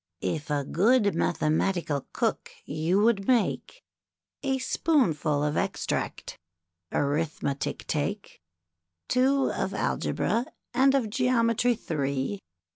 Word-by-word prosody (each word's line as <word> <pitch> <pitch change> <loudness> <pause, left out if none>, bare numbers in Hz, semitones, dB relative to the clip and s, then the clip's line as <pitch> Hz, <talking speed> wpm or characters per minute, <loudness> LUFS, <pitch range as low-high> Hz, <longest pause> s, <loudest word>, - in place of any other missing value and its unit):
If 145 - -2
a 145 -1 0
good 205 - +3
Mathematical 155 -2 0
Cook - - -1 0.2
you 160 +6 +1
would 215 -4 +2
make, 255 - 0 0.6
A 270 -1 0
spoonful 170 - +1
of 150 0 0
extract - - -3 0.5
Arithmetic 145 -1 -1
take; 190 - -3 0.7
Two 265 +2 +2
of - - -2
Algebra, 235 +3 0 0.3
and 270 +2 +4
of 235 -6 0
Geometry 245 -1 +2
three. 140 - -2
195 Hz, 100 wpm, -27 LUFS, 150-250 Hz, 0.7 s, and